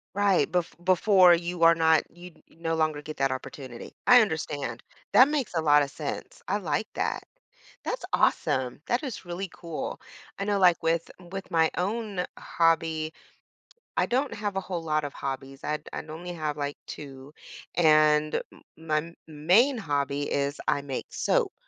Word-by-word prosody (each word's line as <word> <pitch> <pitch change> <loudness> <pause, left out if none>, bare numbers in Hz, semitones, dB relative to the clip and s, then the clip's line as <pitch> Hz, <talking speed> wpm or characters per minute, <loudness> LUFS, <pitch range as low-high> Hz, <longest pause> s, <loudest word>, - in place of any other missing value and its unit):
Right, 200 -2 +3
bef 180 -2 0
before, 185 -1 +6
you 170 0 -1
are 165 0 +8
not 160 -1 +4
you 180 +1 -10 0.2
no 165 0 -3
longer 155 -2 0
get 155 +1 -7
that 135 -1 +1
opportunity. 130 -2 -8
I 250 0 +9
understand. 145 - -3 0.3
That 255 - +8
makes 290 -8 -1
a 165 - +2
lot 150 -1 +5
of 140 - -3
sense. - - -6
I - - 0
like - - -1
that. - - -2 0.6
That's - - -3
awesome. 130 +1 +1
That 240 +4 0
is 255 -9 -6
really 180 +2 -5
cool. 165 -2 -6 0.4
I 200 - -2
know, 200 -1 0
like, 175 -2 +5
with 165 0 0 0.2
with 195 0 -6
my 160 -1 +4
own 200 -1 -2
hobby, 165 -1 +1 0.9
I - - +2
don't 265 +3 0
have 205 -2 -3
a 195 - 0
whole 180 -3 -4
lot 155 -1 0
of 145 - -5
hobbies. 135 0 -6
I'd 150 0 -3
I'd 155 - -6
only 175 +3 -6
have, 155 -3 -3
like, 145 0 -3
2 140 0 -9 0.4
and 155 -2 +4
m - - -19
my 160 +1 -2
main 185 - +3
hobby 145 -5 -1
is 140 +1 -1
I 140 - +2
make 135 -2 -6
soap. 480 -6 +1
165 Hz, 165 wpm, -27 LUFS, 150-185 Hz, 0.9 s, I